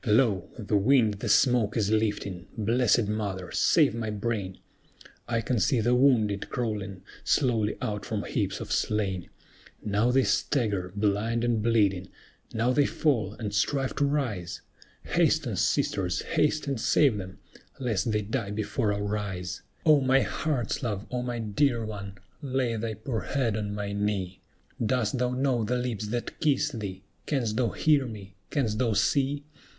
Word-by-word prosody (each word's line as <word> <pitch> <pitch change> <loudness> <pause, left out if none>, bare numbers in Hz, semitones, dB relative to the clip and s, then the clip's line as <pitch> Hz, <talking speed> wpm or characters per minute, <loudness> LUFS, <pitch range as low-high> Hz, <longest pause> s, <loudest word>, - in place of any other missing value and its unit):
"Lo! 105 -4 +3
the 105 -2 0
wind 110 +1 +4
the - - -3
smoke 120 -5 +3
is 105 -2 +1
lifting. 100 -4 -1
Blessed 115 0 +2
Mother, 100 -4 -3
save - - +4
my 115 -1 -3
brain! 105 -3 -3 0.7
I 115 -1 0
can 120 -1 0
see 130 +2 +2
the 120 +3 +2
wounded 115 -6 +3
crawling 100 -6 -3 0.2
slowly 115 -7 +1
out 105 -1 -2
from 110 -3 -3
heaps - - -2
of - - -7
slain. 95 -4 -1 0.6
Now 105 +3 +2
they 130 +1 +4
stagger, 100 -2 0
blind 105 +3 0
and 120 -2 +1
bleeding; 105 -5 +2 0.4
now 115 +3 +1
they 145 +1 +3
fall, 135 -11 0
and 105 -2 -5
strive 130 +6 0
to 145 - +3
rise; 110 - -2 0.4
Hasten, - - +1
sisters, 90 -3 0
haste 150 +1 +1
and 135 -5 -2
save 135 -8 +3
them, 95 -1 -7 0.4
lest 115 -3 0
they 105 0 0
die 110 0 -2
before 110 +2 -1
our 105 +1 -1
eyes! 90 -4 -4 0.2
"O 155 -3 +6
my 135 +1 +4
heart's 135 -8 -1
love! 105 -5 -3
O 125 -1 -1
my 120 -1 -3
dear 115 +2 +1
one! 100 -2 -7 0.2
lay 130 -4 -1
thy 110 0 -3
poor 110 +1 -3
head 125 -6 -1
on 105 -1 -3
my 100 -1 -3
knee; 100 -3 -2 0.4
Dost 115 0 0
thou 125 0 +1
know 125 -2 +1
the 125 +4 0
lips 120 -4 -3
that 120 +2 -4
kiss 150 -1 +2
thee? 100 -6 -6 0.2
Canst 120 -7 0
thou 120 -1 +1
hear 145 -4 +2
me? 100 -4 -9
canst 115 -7 0
thou 115 -4 +2
see? 140 +6 +1
110 Hz, 160 wpm, -27 LUFS, 100-125 Hz, 0.7 s, O